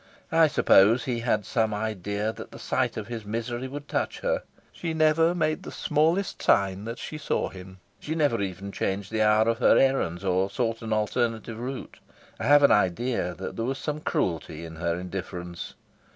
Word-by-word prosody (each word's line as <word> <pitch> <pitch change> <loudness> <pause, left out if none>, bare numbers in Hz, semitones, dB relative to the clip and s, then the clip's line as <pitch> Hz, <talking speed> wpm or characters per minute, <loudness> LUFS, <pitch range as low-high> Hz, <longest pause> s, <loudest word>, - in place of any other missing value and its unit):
I 160 -1 +6
suppose 115 -4 +5
he 120 -2 -2
had 110 -3 0
some 110 -3 0
idea 105 0 -2
that - - -9
the - - -11
sight - - -1
of 110 - -4
his 115 0 -6
misery 115 +4 -3
would 145 +2 -7
touch - - -2
her. - - 0 0.3
She 165 -2 -4
never 160 +2 +3
made 155 -2 0
the - - -8
smallest 165 +6 +1
sign 100 0 +2
that 115 +1 -5
she 155 - -6
saw 145 - -1
him. 95 0 -11 0.2
She 155 - -4
never 145 -9 +2
even 100 +1 -4
changed 100 +1 -2
the 110 -1 0
hour 110 +1 +4
of 115 0 +1
her - - +5
errands 100 -10 +1
or 95 +1 +1
sought 115 +2 -2
an 115 -1 -5
alternative 115 +1 -1
route. 130 +2 -6 0.4
I - - -3
have 145 0 +6
an 140 - +7
idea 95 -1 +1
that 95 - -6
there 115 - -2
was 135 +2 -2
some 150 +1 -3
cruelty 85 - -2
in 80 -1 -9
her 85 0 -1
indifference. 90 -1 -6
115 Hz, 190 wpm, -26 LUFS, 95-135 Hz, 0.4 s, an